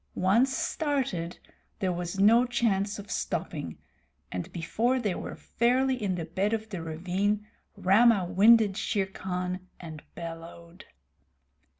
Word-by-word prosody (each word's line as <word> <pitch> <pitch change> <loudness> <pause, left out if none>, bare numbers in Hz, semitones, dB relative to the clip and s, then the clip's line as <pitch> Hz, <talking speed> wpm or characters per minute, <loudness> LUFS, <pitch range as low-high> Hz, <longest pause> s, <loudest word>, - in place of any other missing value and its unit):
Once 225 +8 +3
started, 270 - -2 0.4
there 190 -1 0
was 175 +1 -4
no 225 +5 +6
chance 210 -5 0
of 205 -1 -9
stopping, - - -3 0.5
and 90 -1 -5
before 230 +9 0
they 210 -6 -1
were - - -6
fairly 255 +3 +1
in 195 -3 0
the 170 -2 -4
bed 190 +6 -1
of 220 0 -3
the 190 -5 -5
ravine 185 +6 -1 0.3
Rama 200 +1 +4
winded 205 +2 +5
Shere 205 -2 0
Khan 185 -1 -4
and 160 -3 -9
bellowed. 170 +1 -9
195 Hz, 125 wpm, -28 LUFS, 175-225 Hz, 0.5 s, no